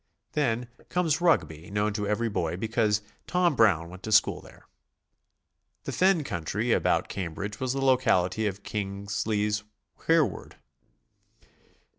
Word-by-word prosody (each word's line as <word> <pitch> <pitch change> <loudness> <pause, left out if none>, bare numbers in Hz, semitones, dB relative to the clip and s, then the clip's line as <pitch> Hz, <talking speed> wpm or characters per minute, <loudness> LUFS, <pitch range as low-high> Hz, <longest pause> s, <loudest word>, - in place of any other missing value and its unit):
Then 125 -5 0 0.2
comes 175 -3 +1
Rugby, 85 - +1
known 105 +1 0
to 105 -1 -2
every 105 +3 0
boy 85 -5 -2
because 110 0 +1 0.2
"Tom 180 -4 +2
Brown" 95 -9 +4
went 90 +1 -11
to 110 - -5
school - - +4
there. - - -17 1.2
The - - -4
fen 185 -4 +3
country 100 - -2
about - - +2
Cambridge 100 +3 -5
was 130 -1 -1
the 135 0 -1
locality 110 -6 +2
of 100 0 -5
Kingsley's 105 +1 -2 0.5
"Hereward." 165 -3 +1
105 Hz, 125 wpm, -27 LUFS, 100-130 Hz, 1.2 s, Brown